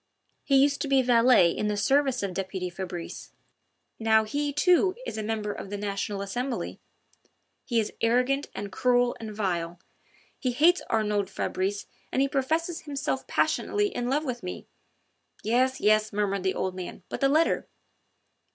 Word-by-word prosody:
"He 275 - +2
used 280 +1 +3
to - - -1
be 270 -1 +4
valet 235 -7 +5
in 210 - -2
the 210 -1 -1
service 270 +1 +2
of 195 -2 -2
deputy 190 -1 -3
Fabrice. 175 -1 -7 0.7
Now 220 -1 +4
he, 285 +7 -2
too, 360 +5 +3
is - - -5
a 220 - -3
member 215 -1 -2
of - - -8
the 205 - -4
National 200 0 -3
Assembly... 245 +5 -3 0.9
he 235 -3 +1
is 215 - -2
arrogant 250 +5 +2
and 200 -1 -5
cruel 245 +2 +2
and 220 -1 -6
vile. 175 -5 -2 0.6
He 255 -3 -1
hates 340 +8 +4
Arnould 210 -3 0
Fabrice 195 +1 -2 0.3
and - - 0
he 275 - +3
professes 320 +5 -1
himself 285 -2 -3
passionately 415 0 +1
in 245 -7 -3
love 295 +4 0
with 245 -3 -3
me." 180 -1 -6 0.8
"Yes, 255 +4 +2
yes!" 215 0 +3
murmured 200 -1 0
the 190 0 0
old 185 - -1
man, 185 0 -7
"but - - -6
the 275 - +4
letter?" 315 +4 +2
230 Hz, 160 wpm, -27 LUFS, 200-275 Hz, 0.9 s, valet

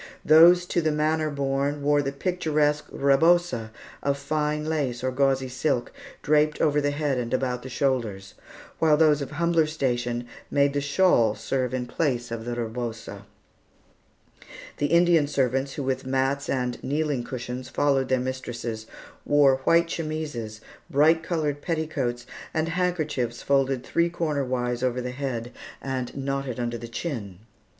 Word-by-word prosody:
Those 170 +3 +7
to 175 - 0
the 155 -1 +1
manor 155 +1 +1
born 140 0 -1
wore 145 0 +3
the 135 -1 -2
picturesque 150 -2 0
rebosa 140 -4 +2 0.3
of 140 0 0
fine 150 +1 -1
lace 140 -6 -2
or 130 - 0
gauzy 135 0 +1
silk, 130 0 -1 0.3
draped 150 0 +2
over 150 -2 +2
the 145 - +1
head 145 -2 -1
and 120 -1 -4
about 125 -1 -2
the 130 - -8
shoulders; 115 -8 -1 0.5
while 155 -2 +4
those 150 -2 +4
of 140 - -4
humbler 170 -2 +1
station 120 -5 -2 0.2
made 140 -1 +2
the 145 - 0
shawl 140 - +3
serve 125 +3 -2
in 130 -1 -2
place 120 -3 -1
of 115 -1 -5
the 120 0 -3
rebosa. 115 -1 -5 1.5
The 145 - +1
Indian 170 -1 +4
servants, 135 -1 0
who 145 - -4
with 130 0 -1
mats 135 +1 -1
and 125 -2 -2
kneeling 145 -2 -1
cushions 125 +1 -6
followed 135 -2 +1
their 130 - +2
mistresses, 120 -3 -5 0.4
wore 145 -2 +4
white 170 0 +5
chemises, 150 -10 -4 0.3
bright 160 +2 +4
colored 155 -4 -2
petticoats, 150 -7 -2 0.3
and 160 +1 0
handkerchiefs 155 -9 -1
folded 135 -2 +1
three 170 +5 +1
cornerwise 130 -7 -1
over 125 -1 0
the 125 0 -4
head 125 -3 -4 0.3
and 130 -2 -4
knotted 135 -2 -3
under 120 -1 -2
the 115 - -7
chin. 115 - -5
140 Hz, 145 wpm, -25 LUFS, 125-155 Hz, 1.5 s, Those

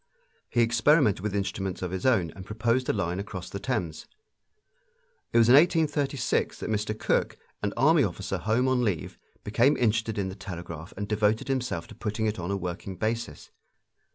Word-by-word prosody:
He 120 - +2
experimented 115 - +4
with 105 +1 -3
instruments 95 -2 -2
of 90 - -3
his 95 +5 -1
own 95 -11 +2
and 95 - -10
proposed 115 +5 0
a - - +3
line 90 -3 -1
across 100 -3 -6
the 100 - -4
Thames. 95 -10 -3 1.2
It - - +2
was 115 -1 +6
in 120 - +7
1836 145 -3 +2
that - - -4
Mr. 110 0 -1
Cooke, - - 0 0.2
an 100 - -1
army 150 +4 +5
officer 95 -1 -3
home 110 +8 +1
on 130 -1 +2
leave, 95 -9 -2 0.2
became 120 +7 +3
interested 110 -1 +1
in 95 -2 -1
the 95 - -7
telegraph 85 -4 -7
and 100 +1 -3
devoted 105 +3 +1
himself 125 -10 -1
to - - -13
putting 110 0 -3
it 105 -2 -1
on 85 +1 -4
a 100 - 0
working 90 +1 -5
basis. 110 -6 -3
105 Hz, 180 wpm, -27 LUFS, 95-120 Hz, 1.2 s, in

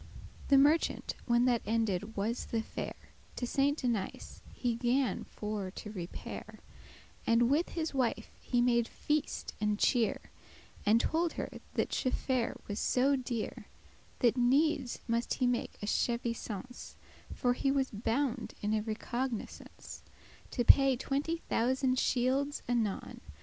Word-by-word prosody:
The 275 - +6
merchant, 295 +4 +3
when 240 0 +4
that 245 -2 +3
ended 220 -1 -1
was 220 +5 -1
the 225 -1 -1
fair, - - -5 0.4
To 245 - -2
Saint 280 +3 +1
Denis 235 -6 -2
he 245 -2 -1
gan 245 +3 +1
for 210 -2 -4
to 210 +2 -8
repair, 180 -4 -7 0.7
And 235 +2 +4
with 315 +5 +2
his 320 -2 -1
wife 245 -4 0
he 245 -1 +1
made 235 -1 +3
feast 300 0 -2
and 210 -1 +1
cheer, 235 +1 +1 0.6
And 220 +2 +6
tolde 330 +6 +1
her - - -4 0.3
that - - +1
chaffare* 255 -1 -1
was 205 0 -3
so 270 +3 +3
dear, 245 -4 -2 0.2
*merchandise - - -28
That 245 0 +4
needes 270 +2 +2
must 230 0 0
he 255 - +1
make 245 -1 -1
a - - 0
chevisance;* 235 0 -2
*loan - - -25
<11> - - -9
For 245 -1 +2
he 270 +2 0
was 270 -1 +1
bound 235 +4 -1
in 210 +1 +1
a 215 - +2
recognisance 235 +2 -5 0.5
To 245 - 0
paye 275 0 +7
twenty 285 +6 -1
thousand 255 +2 +2
shields* 265 +4 +1
anon. 230 -5 -1
245 Hz, 145 wpm, -32 LUFS, 225-270 Hz, 0.7 s, paye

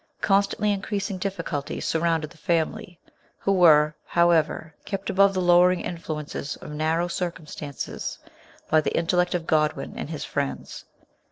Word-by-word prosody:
Con 195 -1 +4
stantly 205 +1 -1
increasing 200 -1 -3
difficulties 175 -7 -3
surrounded 165 -2 0
the 175 - -17
family, 175 +4 -1 0.4
who 195 - 0
were, 155 -5 +6
however, 165 -2 +2
kept 195 -1 -4
above 195 +1 +4
the 185 - +1
lowering 180 0 +5
influences 150 -4 -5
of - - -10
narrow 160 +3 0
circumstances 165 -5 -5 0.5
by 155 - +4
the - - -1
intellect 180 +1 +1
of 170 -2 -2
Godwin 155 -1 0
and - - -5
his - - -5
friends. 70 -1 -4
170 Hz, 140 wpm, -25 LUFS, 155-185 Hz, 0.5 s, were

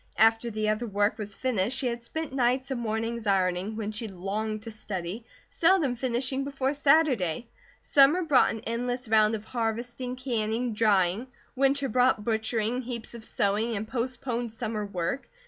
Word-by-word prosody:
After 225 +1 +4
the 215 -1 -2
other 215 +3 -1
work 205 +1 +1
was 205 -1 -5
finished 245 0 0
she 260 - -2
had 235 -1 -1
spent 315 +4 -5
nights 260 +1 +1
and 250 -2 -2
mornings 225 0 -2
ironing, 190 +1 +1
when 215 -1 -3
she 220 +1 -4
longed 210 +3 -3
to 225 - -6
study, 205 0 -4 0.2
seldom 330 -7 +3
finishing 255 +2 -1
before 275 0 -1
Saturday. 275 - +3 0.4
Summer 290 +6 +5
brought 295 -6 +4
an 225 - -4
endless 245 +2 -2
round 215 0 +4
of 215 0 -7
harvesting, 240 +2 -3
canning, 235 -2 -1
drying; 210 0 +2 0.3
winter 275 +1 +2
brought 250 -3 +2
butchering, 225 +1 0
heaps 240 -2 -6
of 235 -1 -9
sewing, 220 +3 0
and 210 +1 -3
postponed 240 0 -3
summer 215 -1 -3
work. 185 +7 -3
230 Hz, 160 wpm, -28 LUFS, 215-255 Hz, 0.4 s, Summer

